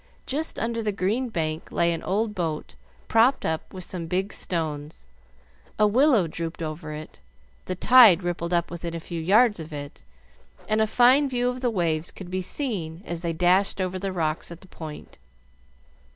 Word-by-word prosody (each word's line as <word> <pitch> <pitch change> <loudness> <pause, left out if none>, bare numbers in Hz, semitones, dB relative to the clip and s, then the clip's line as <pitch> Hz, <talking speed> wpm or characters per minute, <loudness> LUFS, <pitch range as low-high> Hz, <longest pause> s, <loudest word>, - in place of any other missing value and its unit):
Just 305 +4 -3
under 230 0 -1
the 215 -1 -1
green 210 +7 -1
bank 160 -5 -3
lay 170 0 +2
an 165 - -4
old 210 +3 -1
boat 165 -5 -3 0.3
propped 235 +4 +3
up 160 0 -2
with 185 -1 -7
some 175 -2 -5
big 190 +4 -1
stones. 155 - -4 0.7
A 210 - +4
willow 240 - +4
drooped 165 +1 -5
over 155 0 -5
it, 155 - -9 0.5
the 185 - -3
tide 210 -3 +7
rippled 175 -1 -3
up 170 -1 +1
within 170 -1 -5
a - - -3
few 165 0 -6
yards 210 +4 +4
of 160 0 -8
it, 145 -1 -7 0.7
and 215 0 +2
a 220 - +3
fine 255 +5 +5
view 245 -1 0
of 250 0 -5
the 250 - +1
waves 170 -6 0
could 185 -2 -10
be 185 0 -1
seen 185 - -3
as 170 -1 -4
they 170 -1 -1
dashed 180 +4 +2
over 185 0 -2
the 195 0 -3
rocks 160 -2 -2
at 170 - -10
the 190 - -15
point. 155 -4 -10
180 Hz, 180 wpm, -25 LUFS, 165-220 Hz, 0.7 s, tide